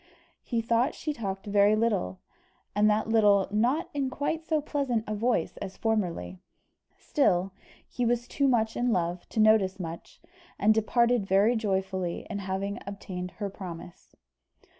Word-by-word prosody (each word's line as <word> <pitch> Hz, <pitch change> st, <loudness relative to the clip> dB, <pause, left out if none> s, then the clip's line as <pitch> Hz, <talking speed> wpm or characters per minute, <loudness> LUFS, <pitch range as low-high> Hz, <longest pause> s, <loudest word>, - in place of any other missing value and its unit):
He 230 Hz, -2 st, -2 dB
thought 235 Hz, +5 st, +1 dB
she 305 Hz, -, -3 dB
talked 195 Hz, -6 st, -5 dB
very 205 Hz, +1 st, +4 dB
little, 210 Hz, -, 0 dB, 0.5 s
and 210 Hz, +1 st, +4 dB
that 215 Hz, +1 st, +1 dB
little 205 Hz, -3 st, +4 dB
not 250 Hz, -, +1 dB
in 275 Hz, -2 st, -1 dB
quite 290 Hz, +4 st, -2 dB
so 315 Hz, -1 st, +1 dB
pleasant 275 Hz, -6 st, -1 dB
a 215 Hz, -, -3 dB
voice 230 Hz, +4 st, 0 dB
as 195 Hz, -1 st, -7 dB
formerly; 195 Hz, -5 st, -1 dB, 0.6 s
still, 190 Hz, -9 st, +1 dB, 0.4 s
he 245 Hz, -, -3 dB
was 240 Hz, 0 st, 0 dB
too 280 Hz, -, +1 dB
much 225 Hz, -3 st, +2 dB
in 245 Hz, 0 st, +1 dB
love 175 Hz, -2 st, -1 dB
to -, -, -3 dB
notice 215 Hz, -3 st, +4 dB
much, 165 Hz, -2 st, -7 dB, 0.4 s
and 215 Hz, +2 st, +4 dB
departed 235 Hz, 0 st, +2 dB
very 200 Hz, +5 st, +4 dB
joyful 190 Hz, -3 st, -1 dB
in 190 Hz, +4 st, -4 dB
having 195 Hz, +1 st, -3 dB
obtained 185 Hz, -2 st, -6 dB
her 205 Hz, -2 st, -3 dB
promise. 175 Hz, -3 st, -10 dB
215 Hz, 150 wpm, -28 LUFS, 190-240 Hz, 0.6 s, very